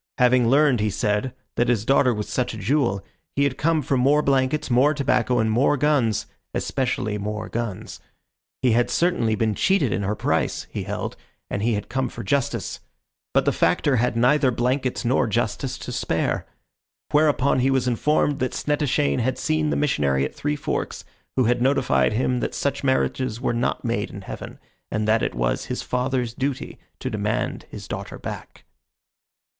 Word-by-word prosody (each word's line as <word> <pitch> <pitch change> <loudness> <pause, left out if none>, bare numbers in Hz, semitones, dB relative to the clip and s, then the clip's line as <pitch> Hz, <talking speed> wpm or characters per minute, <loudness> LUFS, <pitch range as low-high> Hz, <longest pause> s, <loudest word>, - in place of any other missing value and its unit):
Having 125 -1 +4
learned, 140 -2 +4
he 105 0 +1
said, 105 +5 0 0.3
that 120 - +2
his 115 -3 +1
daughter 135 0 +4
was 105 -2 -3
such 125 -3 -1
a - - -7
jewel, 110 -2 0 0.3
he 140 - +2
had 140 -2 +1
come 155 +2 +1
for 135 - 0
more 145 +4 +3
blankets, 135 +1 +1
more 135 +5 +4
tobacco, 125 -3 +1
and 110 -1 +2
more 135 +6 +3
guns 130 -6 +2 0.3
especially 110 -5 -1
more 105 +1 -4
guns. 115 -2 -4 0.6
He 125 - +4
had 120 +2 +2
certainly 165 -11 +1
been 110 0 +1
cheated 145 - +2
in 95 - -1
her 100 +2 -1
price, - - -1
he - - -4
held, - - -4 0.4
and 100 - -2
he 115 +1 +1
had 105 - -4
come 130 -1 -1
for 120 - -7
justice. 135 +6 -1 0.5
But - - +2
the - - +3
Factor 140 -3 +2
had 120 0 +1
neither 130 +3 +4
blankets 125 +1 -1
nor 125 0 +2
justice 120 +4 -1
to 125 - -7
spare. 100 -9 -1 0.6
Whereupon 145 -3 +3
he 130 +2 +3
was 130 -2 +1
informed 145 +4 +1
that 130 - -1
Snettishane 145 -2 +1
had 130 +2 0
seen 155 -1 0
the - - 0
missionary 70 - +1
at - - -6
Three 145 +1 -2
Forks, 145 - -3 0.3
who 130 - +3
had 120 +1 +2
notified 125 - +2
him 125 +2 +1
that - - -3
such 140 0 -1
marriages 130 -3 0
were 125 - 0
not 120 +1 -1
made - - -1
in - - -8
heaven, - - -8 0.3
and 105 0 -1
that 110 0 +3
it - - -1
was - - 0
his - - -4
father's 125 -1 -1
duty 135 +1 -3 0.2
to - - -4
demand - - -2
his - - -9
daughter - - -6
back. - - -8
125 Hz, 180 wpm, -23 LUFS, 115-140 Hz, 0.6 s, Having